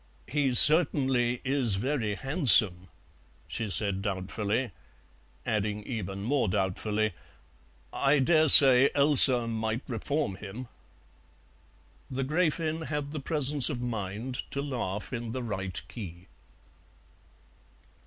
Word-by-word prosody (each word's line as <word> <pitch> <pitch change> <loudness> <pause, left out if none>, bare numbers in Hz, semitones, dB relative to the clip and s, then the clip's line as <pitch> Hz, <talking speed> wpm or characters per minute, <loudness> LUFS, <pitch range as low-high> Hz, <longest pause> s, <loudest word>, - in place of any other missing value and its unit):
"He 135 -3 -2
certainly 130 -6 +3
is 130 -6 +1
very 115 -1 -3
handsome," 110 - +5 0.6
she 110 - -6
said 100 -1 0
doubtfully; 100 +5 -4 0.7
adding 105 -1 -4
even 100 -4 -7
more 130 +1 -1
doubtfully, 105 +2 -3 0.8
"I 140 +2 0
dare 155 +3 +1
say 135 -1 +9
dear - - -4
Elsa 140 -4 +4
might 110 +1 -4
reform 130 -3 -4
him." 110 +5 -10 1.4
The 135 +1 -5
Gräfin 160 +1 -3
had 145 -1 -5
the 155 - -6
presence 145 -1 +1
of 135 -5 -5
mind 115 +2 -6
to 140 - -5
laugh 120 -7 -6
in 115 -2 -6
the 130 -1 -6
right 95 -5 -5
key. 90 -6 -11
120 Hz, 110 wpm, -26 LUFS, 105-140 Hz, 1.4 s, say